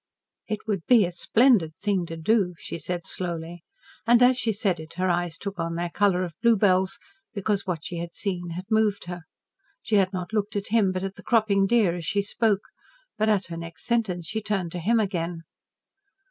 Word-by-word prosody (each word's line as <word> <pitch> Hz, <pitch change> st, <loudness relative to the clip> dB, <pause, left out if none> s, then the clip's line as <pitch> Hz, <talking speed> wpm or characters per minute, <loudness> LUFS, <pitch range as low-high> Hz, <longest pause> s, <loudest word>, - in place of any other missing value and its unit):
"It 215 Hz, -1 st, -3 dB
would 200 Hz, -6 st, -2 dB
be 235 Hz, -6 st, +6 dB
a 175 Hz, -, -4 dB
splendid 190 Hz, -3 st, +3 dB
thing 195 Hz, -2 st, -1 dB
to 165 Hz, -, -6 dB
do," 180 Hz, +1 st, +1 dB
she 170 Hz, -, -7 dB
said 175 Hz, +3 st, -4 dB
slowly, 170 Hz, -1 st, -4 dB, 0.5 s
and 240 Hz, +1 st, +6 dB
as 255 Hz, +1 st, +6 dB
she 235 Hz, -2 st, 0 dB
said 195 Hz, -4 st, 0 dB
it 160 Hz, +1 st, -10 dB
her 185 Hz, 0 st, +1 dB
eyes 175 Hz, -1 st, -1 dB
took 200 Hz, -2 st, -6 dB
on 165 Hz, 0 st, -2 dB
their 170 Hz, 0 st, -2 dB
colour 190 Hz, -2 st, +2 dB
of 175 Hz, -2 st, -5 dB
bluebells, 195 Hz, -5 st, +3 dB, 0.4 s
because 200 Hz, 0 st, -1 dB
what 170 Hz, -3 st, -3 dB
she 175 Hz, -, -5 dB
had 170 Hz, 0 st, -6 dB
seen 180 Hz, -4 st, -3 dB
had 185 Hz, +2 st, -6 dB
moved 215 Hz, -3 st, +2 dB
her. 175 Hz, 0 st, -6 dB, 0.6 s
She 220 Hz, -2 st, +2 dB
had 190 Hz, -2 st, +3 dB
not 185 Hz, +2 st, -5 dB
looked 210 Hz, 0 st, -1 dB
at 200 Hz, -1 st, -2 dB
him, 210 Hz, -3 st, +3 dB
but 185 Hz, 0 st, -3 dB
at 195 Hz, 0 st, -5 dB
the -, -, -11 dB
cropping 215 Hz, -5 st, +3 dB
deer 210 Hz, -6 st, +3 dB
as 170 Hz, -2 st, -6 dB
she 200 Hz, +3 st, +1 dB
spoke, 205 Hz, -1 st, +1 dB, 0.6 s
but 215 Hz, +1 st, +2 dB
at 200 Hz, -3 st, +2 dB
her 165 Hz, -, -5 dB
next 165 Hz, 0 st, -8 dB
sentence 220 Hz, -8 st, 0 dB
she 220 Hz, +7 st, -3 dB
turned 195 Hz, -5 st, -2 dB
to 180 Hz, -, -4 dB
him 225 Hz, +7 st, +2 dB
again. 175 Hz, -5 st, -2 dB
190 Hz, 205 wpm, -25 LUFS, 175-215 Hz, 0.6 s, be